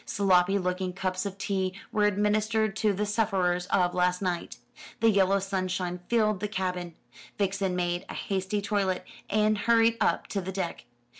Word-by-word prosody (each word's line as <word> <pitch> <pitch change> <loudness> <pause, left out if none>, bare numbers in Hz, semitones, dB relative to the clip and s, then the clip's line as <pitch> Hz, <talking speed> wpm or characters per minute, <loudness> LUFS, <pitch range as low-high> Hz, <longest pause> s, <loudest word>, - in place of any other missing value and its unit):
Sloppy 195 -1 +3
looking 180 0 -2
cups 185 +1 -2
of 195 0 -7
tea 190 -1 -1 0.2
were 210 -1 +2
administered 210 +1 +1
to 215 -1 +2
the 205 +2 -1
sufferers 190 -5 0
of 180 -2 +2
last 180 0 +1
night. 180 -3 -3 0.4
The 225 0 +5
yellow 195 -1 +3
sunshine 185 -2 -2
filled 215 -4 +2
the 210 - -2
cabin. 180 -4 -3 0.4
Vixen 195 -2 0
made 175 0 -1
a - - -6
hasty 195 +1 -2
toilet, 195 -3 0 0.2
and 215 +1 +3
hurried 230 +1 +4
up - - +2
to 200 - -2
the 190 +1 -5
deck. 185 -8 -4
195 Hz, 160 wpm, -28 LUFS, 180-210 Hz, 0.4 s, The